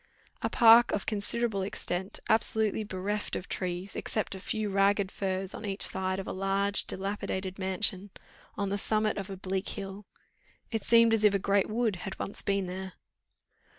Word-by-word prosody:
A - - 0
park 235 +1 +7
of 205 - -1
considerable 215 0 0
extent, 190 0 -3
absolutely 220 -1 +2
bereft 205 +1 -3
of 185 - -5
trees, 180 +1 -4
except 215 -3 -2
a 190 - -7
few 215 +2 -3
ragged 195 0 +2
firs 190 -1 -2
on - - -8
each 200 -1 +3
side 190 0 -1
of 195 - -5
a - - -4
large 195 +1 +2
dilapidated 190 -1 -3
mansion, 190 +1 -1 0.5
on 200 -1 -1
the 200 +1 -1
summit 215 0 +1
of 195 0 -6
a 195 - -6
bleak 190 +1 -3
hill: 195 0 -6 0.6
it 225 -2 -1
seemed 230 -1 +5
as 220 -1 +2
if 205 -1 +5
a - - +4
great 200 0 +1
wood 220 -3 0
had 190 +2 -7
once 200 - -4
been 195 -1 0
there. 185 +1 -6
200 Hz, 175 wpm, -29 LUFS, 190-210 Hz, 0.6 s, park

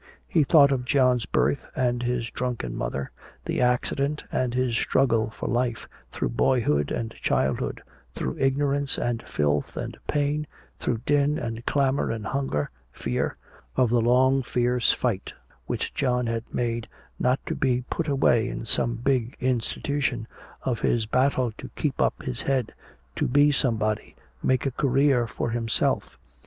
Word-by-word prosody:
He 165 - +3
thought 140 -1 +6
of 130 -2 0
John's 125 -3 +2
birth 140 - +1
and 125 -1 +1
his 120 -1 -1
drunken 120 - -3
mother, 65 0 -3 0.3
the - - -1
accident 140 +4 +1
and 125 -2 0
his 125 -2 +1
struggle 115 -3 +2
for 110 - -6
life, 120 -1 -1 0.2
through - - -2
babyhood 75 - +2
and 115 -1 -2
childhood, 65 0 -1 0.3
through 65 - -3
ignorance 140 +1 +1
and 120 -1 -1
filth 75 -6 -1
and - - -4
pain, 150 +1 0 0.3
through 115 -2 -1
din 145 +1 +3
and 115 -1 -4
clamor 140 -1 +2
and 110 -2 -3
hunger, 135 - -1 0.2
fear; - - -2 0.4
of 125 -3 +3
the 120 -1 +4
long 130 +3 +4
fierce 125 -1 +2
fight 115 -6 -2 0.3
which - - -2
John 125 -2 +1
had 115 0 -3
made 115 -1 -1 0.3
not 125 +2 +2
to - - -2
be 125 -2 +1
"put 165 - -1
away" 125 -4 +3
in 115 - -5
some 115 +1 +2
big 125 0 0
institution, 130 0 -1 0.4
of 125 -4 -1
his 115 -2 +1
battle 130 +1 +2
to - - -7
keep - - -1
up - - +1
his 60 - -3
head, 135 -4 0 0.4
to - - +1
be 145 +3 +5
somebody, 110 -6 0 0.3
make 130 0 +1
a 135 - +1
career 135 -2 +2
for 115 - -3
himself. 115 -1 0
125 Hz, 150 wpm, -26 LUFS, 115-135 Hz, 0.4 s, thought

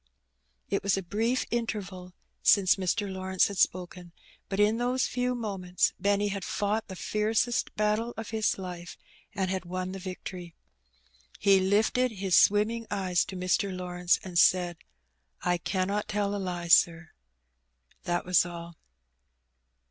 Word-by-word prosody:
^^ - - -49 0.7
It 200 - +1
was 195 -1 +1
a 195 - -3
brief 225 +8 0
interval 195 -6 -4 0.3
since 195 -3 +5
Mr. 200 +2 -1
Lawrence 190 0 +1
had 200 - -5
spoken, 180 -1 -1 0.4
but 195 - -3
in 210 +2 +3
those 250 +1 +1
few 250 0 -1
moments 195 -6 -1
Benny 200 +1 +1
had 200 -1 -4
fought 210 +3 -1
the 190 - -8
fiercest 220 +5 0
battle 215 +2 0
of 225 -1 -6
his 220 -1 0
life, 180 -2 -7 0.4
and 190 -1 -1
had 190 -1 -2
won 185 +1 -4
the 195 - -6
victory. 180 -2 -8 0.8
He 195 -1 +4
lifted 220 +6 +2
his 190 -3 0
swimming 210 +5 +3
eyes 185 -3 +1
to 190 - -8
Mr. 185 +2 0
Lawrence 180 -1 0
and 180 -2 -1
said 175 -2 +3 0.4
— 60 0 -45
"I 175 0 +1
cannot 195 +4 -1
tell 205 -1 -1
a 200 - -3
lie, 175 -2 -4
sir.^^ 170 0 +4 1.0
That 175 0 -1
was 180 0 +4
all. 170 -1 -8
190 Hz, 150 wpm, -28 LUFS, 180-210 Hz, 1.0 s, since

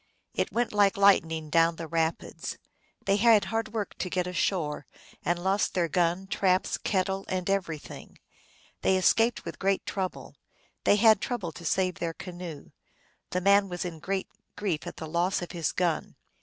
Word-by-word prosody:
It - - -1
went 240 -1 0
like 205 0 +4
lightning 160 -6 +3
down 165 0 +4
the 165 - -6
rapids. 160 +1 -2 0.5
They 195 0 +3
had 225 -1 +5
hard 225 -1 -2
work 215 -2 -3
to 185 - -2
get 180 0 0
ashore, 175 -4 -1 0.4
and 175 - +1
lost 190 +3 0
their 175 -2 +2
gun, 175 +3 +1
traps, 190 -1 +1
kettle, 190 0 0
and 185 -1 -2
everything. 180 -6 -3 0.6
They 190 - +3
escaped 225 +5 +3
with - - -7
great 195 0 +1
trouble; 190 -2 -4 0.5
they - - +6
had 215 -1 +5
trouble 220 -9 -3
to 170 +2 -11
save 185 +2 0
their 165 -1 -2
canoe. 175 -3 -8 0.6
The 180 - -1
man 200 +1 +4
was 175 0 -4
in 170 -3 -6
great 195 +4 -2 0.3
grief 185 -7 -2
at - - -7
the - - -5
loss 175 +3 0
of 175 - -7
his 170 -4 -1
gun. 170 -4 -1
185 Hz, 170 wpm, -28 LUFS, 170-195 Hz, 0.6 s, they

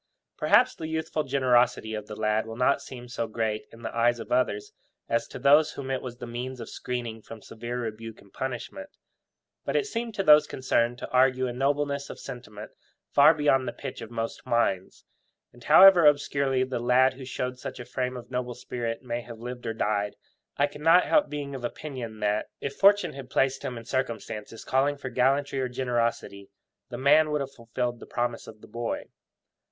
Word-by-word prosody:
Perhaps - - +4
the 160 - -6
youthful 160 0 -2
generosity 125 -4 +2
of 105 -1 -5
the 105 - -7
lad 110 +1 0
will 115 - -7
not 125 +3 +2
seem 125 -1 -9
so 120 -1 -3
great 110 -1 -2
in 115 +1 -14
the - - -5
eyes 120 +1 +2
of 115 - -9
others 115 -5 0 0.3
as 115 0 0
to - - -9
those 150 +3 +5
whom 135 -1 -5
it 130 - -1
was 120 -2 -7
the - - -7
means 125 +2 -5
of 115 - -7
screening 120 -3 -5
from 115 +1 -11
severe 120 +3 -6
rebuke 115 0 -6
and 100 -1 -20
punishment. 130 - -5 0.7
But - - -3
it 440 - +2
seemed 230 - -4
to 195 - 0
those 150 -2 +7
concerned 120 -2 0
to - - -8
argue 130 0 +3
a 125 - -3
nobleness 140 +2 -1
of - - -8
sentiment 115 -5 -9 0.4
far 150 +3 +7
beyond 135 -4 +2
the - - -3
pitch 135 -3 -7
of 115 - -8
most 115 -1 -4
minds; 95 -5 -1 0.5
and 120 0 -16
however 175 +2 +8
obscurely 140 -2 +2
the 130 -1 -3
lad 125 +2 +4
who 130 0 -10
showed 125 0 -4
such - - -7
a 120 - -7
frame 125 0 -3
of 120 0 -11
noble 125 -1 -3
spirit 120 -1 -4
may 120 -1 -3
have 115 0 -10
lived 120 +1 -7
or 115 - -1
died, 105 -1 -1 0.4
I 145 - +4
cannot 165 +5 +4
help 300 - +3
being 145 -1 -5
of 130 -2 -7
opinion 120 -4 -6
that, 105 0 0
if 140 - -5
fortune 205 +1 +4
had 135 -2 -9
placed 135 0 +1
him 125 - -5
in 115 - -9
circumstances 115 -3 -4
calling 140 +2 +1
for 130 -2 -6
gallantry 135 +3 +1
or 130 - -1
generosity, 120 -5 -2 0.4
the - - -6
man 150 +3 +5
would 150 -1 0
have 135 0 -5
fulfilled 120 0 -4
the - - -11
promise 120 -1 -2
of 110 -1 -12
the - - -13
boy. 115 +1 -3
125 Hz, 200 wpm, -27 LUFS, 115-140 Hz, 0.7 s, however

